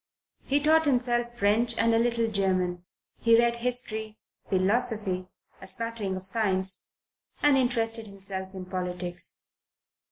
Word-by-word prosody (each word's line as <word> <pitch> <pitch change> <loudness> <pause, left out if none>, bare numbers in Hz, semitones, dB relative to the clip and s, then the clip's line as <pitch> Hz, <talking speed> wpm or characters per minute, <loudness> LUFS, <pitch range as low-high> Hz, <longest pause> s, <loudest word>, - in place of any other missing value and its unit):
He 280 +1 +1
taught 315 +2 +4
himself 240 -3 +1
French 220 +2 +2
and 230 0 +3
a 225 - +4
little 235 -1 +1
German. 185 -4 0 0.3
He 230 0 +5
read 235 0 +2
history, 225 -3 -1 0.3
philosophy, 195 -1 0 0.3
a 190 - -9
smattering 215 -1 0
of 185 0 -5
science, 190 -2 0 0.6
and 290 -1 +5
interested 230 -3 0
himself 195 -1 -6
in 185 -1 -6
politics. 180 -1 -2
220 Hz, 125 wpm, -27 LUFS, 190-240 Hz, 0.6 s, He